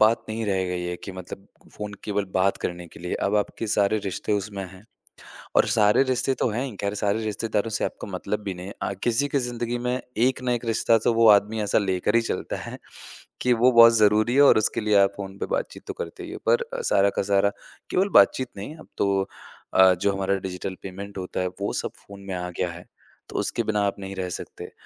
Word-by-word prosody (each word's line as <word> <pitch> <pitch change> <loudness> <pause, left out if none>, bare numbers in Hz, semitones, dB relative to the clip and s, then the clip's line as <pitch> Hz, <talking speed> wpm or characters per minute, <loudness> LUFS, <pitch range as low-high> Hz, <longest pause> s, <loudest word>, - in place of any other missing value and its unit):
बात 110 +2 +4
नहीं 110 +1 -3
रह 95 -2 +1
गई 90 0 -2
है 90 0 -3
कि 95 - -6
मतलब 95 +1 -9 0.3
फ़ोन 105 -1 -5
केवल 105 -1 -1
बात 95 +1 +2
करने 90 0 -5
के - - -14
लिए, 90 +1 -3
अब 105 +2 0
आपके 105 +2 -2
सारे 105 -1 +2
रिश्ते 100 +2 -2
उसमें 100 -1 -2
हैं, 95 +2 -15 0.7
और - - +5
सारे 105 +4 +4
रिश्ते 130 0 0
तो - - +2
हैं 120 +5 -2
ही, 125 -7 -6
ख़ैर 100 +1 -2
सारे 105 +1 0
रिश्तेदारों 110 +1 -1
से - - -1
आपका - - -5
मतलब 100 +3 -3
भी 100 -2 -4
नहीं 90 +1 -8
है। 100 - -7
अ, - - -1
किसी 120 +4 +1
की 140 - +1
ज़िंदगी 120 -1 -3
में 125 +1 -1 0.3
एक 130 0 -1
ना 125 -1 0
एक 120 0 -2
रिश्ता 115 0 +3
तो 120 - +5
वो 115 -1 +5
आदमी 105 +2 +4
ऐसा 105 - +2
लेकर 95 +1 0
ही 115 - +5
चलता - - -3
है, - - -7 0.6
कि 125 - +2
वो 120 +2 +4
बहुत 115 0 +9
ज़रूरी 110 +3 +4
है 140 - +6
और 140 - +7
उसके 110 - 0
लिए 105 -1 +2
आप 100 0 +4
फ़ोन 100 -1 -7
पे - - -2
बातचीत - - -5
तो - - -5
करते 470 - -7
ही - - -8
हो। - - -6
पर 485 - +4 0.2
अ, - - -3
सारा 100 - +3
का - - +3
सारा 100 0 +4 0.4
केवल 190 +2 +2
बातचीत 130 -1 +2
नहीं 100 +8 -6
है 160 - -11
अब - - -15
तो 100 -1 +1 0.5
अ, 95 0 +7
जो 100 +3 0
हमारा 95 0 0
डिजिटल 95 0 -5
पेमेंट 100 +1 -8
होता 90 0 -4
है 90 - 0
वो 100 - -1
सब - - -4
फ़ोन 100 0 -11
में 95 - -3
आ 90 0 -3
गया 90 - +1
है, 85 +1 -10 0.4
तो - - -6
उसके 115 - -1
बिना 105 -1 0
आप 100 - -2
नहीं 95 0 -6
रह 95 -1 -3
सकते। - - -7
105 Hz, 240 wpm, -25 LUFS, 95-115 Hz, 0.7 s, बहुत